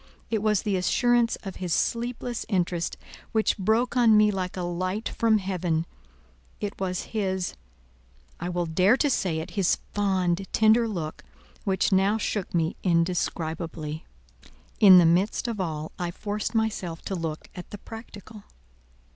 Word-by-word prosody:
It 220 Hz, -2 st, +1 dB
was 210 Hz, -2 st, +2 dB
the 200 Hz, -2 st, 0 dB
assurance 240 Hz, +5 st, +2 dB
of 195 Hz, -2 st, -7 dB
his 180 Hz, -2 st, -4 dB
sleepless 240 Hz, 0 st, -2 dB
interest 175 Hz, -4 st, -1 dB, 0.4 s
which 220 Hz, -1 st, +1 dB
broke 220 Hz, +6 st, +1 dB
on 230 Hz, -3 st, +6 dB
me 210 Hz, 0 st, +5 dB
like 185 Hz, -2 st, -3 dB
a 180 Hz, -, -2 dB
light 185 Hz, +5 st, -2 dB
from 225 Hz, -1 st, +2 dB
heaven; 180 Hz, -4 st, -1 dB, 0.7 s
it 205 Hz, -1 st, -3 dB
was 185 Hz, -1 st, -1 dB
his—I 65 Hz, -, -6 dB
will 175 Hz, -1 st, -1 dB
dare 185 Hz, +8 st, +3 dB
to 290 Hz, -1 st, +2 dB
say 180 Hz, -9 st, 0 dB
it—his 190 Hz, +2 st, 0 dB, 0.2 s
fond, 190 Hz, -2 st, 0 dB
tender 220 Hz, +2 st, +4 dB
look, 165 Hz, -8 st, -5 dB, 0.4 s
which 190 Hz, 0 st, +1 dB
now 195 Hz, +3 st, +3 dB
shook 205 Hz, -3 st, -2 dB
me 165 Hz, 0 st, 0 dB
indescribably. 165 Hz, -2 st, -1 dB, 0.8 s
In 195 Hz, -5 st, +9 dB
the 175 Hz, -, +7 dB
midst 180 Hz, +8 st, +2 dB
of 225 Hz, -4 st, -2 dB
all 155 Hz, -3 st, -3 dB
I 175 Hz, -1 st, -1 dB
forced 205 Hz, +5 st, -4 dB
myself 200 Hz, -7 st, -1 dB
to -, -, -4 dB
look 165 Hz, -4 st, -4 dB
at 180 Hz, -, -9 dB
the 205 Hz, -, -7 dB
practical. 215 Hz, -1 st, -11 dB
190 Hz, 145 wpm, -26 LUFS, 170-215 Hz, 0.8 s, In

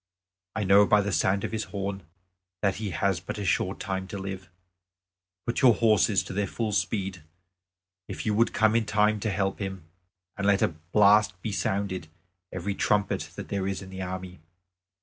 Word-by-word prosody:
I 110 Hz, -, 0 dB
know 100 Hz, +1 st, +6 dB
by 105 Hz, -1 st, +5 dB
the 100 Hz, 0 st, -2 dB
sound 95 Hz, +2 st, +1 dB
of -, -, -3 dB
his 110 Hz, -1 st, -2 dB
horn 100 Hz, -1 st, -4 dB, 0.6 s
that 100 Hz, -1 st, +2 dB
he 105 Hz, -1 st, -3 dB
has 95 Hz, +1 st, 0 dB
but 90 Hz, -, -6 dB
a 100 Hz, -, -4 dB
short 95 Hz, +1 st, 0 dB
time 95 Hz, -2 st, -3 dB
to 100 Hz, -, -6 dB
live. 95 Hz, -2 st, -6 dB, 1.0 s
Put 120 Hz, +2 st, -1 dB
your 125 Hz, -4 st, +7 dB
horses 110 Hz, -3 st, +3 dB
to -, -, -7 dB
their 100 Hz, 0 st, 0 dB
full 110 Hz, +3 st, -2 dB
speed, 95 Hz, -3 st, -1 dB, 0.9 s
if -, -, -6 dB
you 105 Hz, -, +1 dB
would 115 Hz, +3 st, +3 dB
come 110 Hz, 0 st, +3 dB
in 115 Hz, -2 st, +1 dB
time 105 Hz, 0 st, +2 dB
to 110 Hz, -, -1 dB
help 95 Hz, 0 st, -1 dB
him, 95 Hz, -3 st, -5 dB, 0.5 s
and 100 Hz, -1 st, -1 dB
let 100 Hz, -1 st, +4 dB
a -, -, +3 dB
blast 100 Hz, +5 st, +3 dB
be 110 Hz, -, -2 dB
sounded 100 Hz, -1 st, -2 dB, 0.5 s
by -, -, -6 dB
every 100 Hz, +3 st, -2 dB
trumpet 105 Hz, 0 st, 0 dB
that -, -, -7 dB
there 100 Hz, -2 st, -1 dB
is 95 Hz, 0 st, -3 dB
in 95 Hz, -, -11 dB
the 95 Hz, 0 st, -6 dB
army." 90 Hz, -1 st, -6 dB
100 Hz, 190 wpm, -27 LUFS, 95-105 Hz, 1.0 s, your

